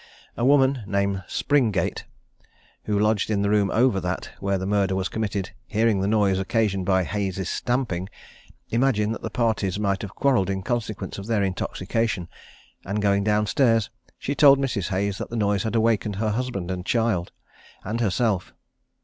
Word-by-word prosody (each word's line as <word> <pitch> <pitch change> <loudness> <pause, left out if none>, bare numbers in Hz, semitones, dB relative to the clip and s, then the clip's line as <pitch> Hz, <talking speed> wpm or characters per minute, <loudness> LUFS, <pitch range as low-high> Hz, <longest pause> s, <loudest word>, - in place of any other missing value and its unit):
A 120 - -3
woman, 135 -1 +4
named 100 -1 0
Springate, 135 -8 0 0.8
who 105 -1 0
lodged 105 0 +1
in 100 -2 +1
the 100 - +1
room 105 -2 +3
over 115 -2 +3
that 90 0 -4
where 100 0 0
the 95 - -4
murder 100 -1 +1
was 95 0 -1
committed, 100 -3 -3 0.2
hearing 110 -2 +2
the 95 - 0
noise 100 -3 +2
occasioned 100 -2 0
by 95 -1 +3
Hayes's 95 -2 -2
stamping, 115 -8 -1 0.6
imagined 115 -3 +2
that - - -7
the - - -4
parties 110 -5 0
might 100 -2 0
have 100 -2 -7
quarrelled 125 -9 +2
in 95 -1 -2
consequence 115 -4 -3
of 100 - -8
their 110 -3 +1
intoxication; 95 0 -2 0.5
and 100 +3 -2
going 100 -1 +2
down 105 0 +2
stairs, 115 -1 +2 0.3
she 140 - -3
told 140 -1 +7
Mrs. 130 -9 -1
Hayes 100 +1 -1
that - - -5
the 120 - -5
noise 100 -3 +1
had 110 +2 -2
awakened 110 -2 +1
her 110 +2 0
husband, 105 -6 -3
her 90 -1 -3
child, 105 -3 0 0.5
and 110 +4 -3
herself. 105 -2 0
105 Hz, 170 wpm, -24 LUFS, 95-115 Hz, 0.8 s, told